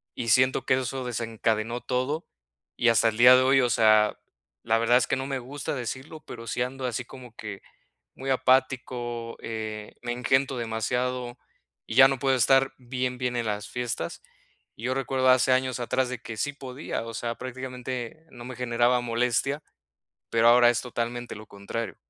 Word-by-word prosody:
y 115 -2 -3
siento 130 +3 +3
que - - +3
eso 130 +1 -3
desencadenó 115 0 -2
todo. 130 +5 -2 0.5
Y 120 - +2
hasta 115 0 +4
el 110 - -6
día 125 +1 +9
de 130 - +5
hoy, 135 +1 +4
o 125 - +2
sea, 110 -1 +4 0.5
la 115 +1 +2
verdad 115 +1 +3
es 125 - +1
que - - +1
no 135 +1 -4
me 135 -1 -2
gusta 140 +4 -5
decirlo, 130 +5 -6
pero 115 -1 -9
sí 120 - -2
ando 130 +1 -3
así 125 0 -2
como 125 -3 -13
que 100 -3 -7 0.5
muy 135 +1 -6
apático, 125 -3 0
eh, 110 -1 -6
me 120 - -3
engento 130 +2 +1
demasiado 120 +2 -2 0.5
y 110 - -5
ya 135 0 +9
no 135 -2 -2
puedo 135 0 +2
estar 135 +2 +4
bien, 125 0 -3
bien 125 -1 -2
en 120 -2 -1
las 105 0 -3
fiestas. 120 -9 -4 0.6
Yo 125 +4 -2
recuerdo, 130 -1 +1
hace 130 +1 +5
años 130 -1 0
atrás, 130 +1 0
de 125 -2 -5
que 115 -2 -8
sí 145 +7 -1
podía, 135 -2 -5
o 115 - -7
sea, 115 0 -2
prácticamente 130 +2 -6
no 120 -1 -10
me 130 -1 -7
generaba 120 0 +2
molestia, 125 +5 0 0.7
pero 115 0 +4
ahora 120 0 +7
es 120 - -1
totalmente 120 -1 -4
lo 110 +1 -10
contrario. 100 +2 -5
125 Hz, 180 wpm, -26 LUFS, 115-130 Hz, 0.7 s, día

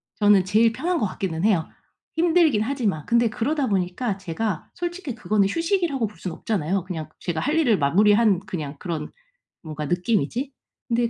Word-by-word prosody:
저는 205 -3 +4
제일 220 +4 +4
편한 335 +9 -1
것 210 - +1
같기는 185 -3 -3
해요, 185 -7 +2 0.5
힘들긴 325 -8 +3
하지만. 220 - -1
근데 235 0 +3
그러다 270 +6 -1
보니까 195 +2 -1
제가 190 0 -3
솔직히 345 -6 -4
그거는 210 -3 +1
휴식이라고 330 - 0
볼 210 - -15
순 180 - -4
없잖아요. 190 0 -1
그냥 165 -4 -6
제가 170 -3 -3
할 295 - 0
일을 245 -11 +3
마무리한 205 +6 +4
그냥 160 -7 -5
그런 160 -2 -5 0.5
뭔가 155 -2 -5
느낌이지. 220 - 0 0.4
근데 235 -1 +1
210 Hz, 370 characters per minute, -24 LUFS, 180-255 Hz, 0.5 s, 저는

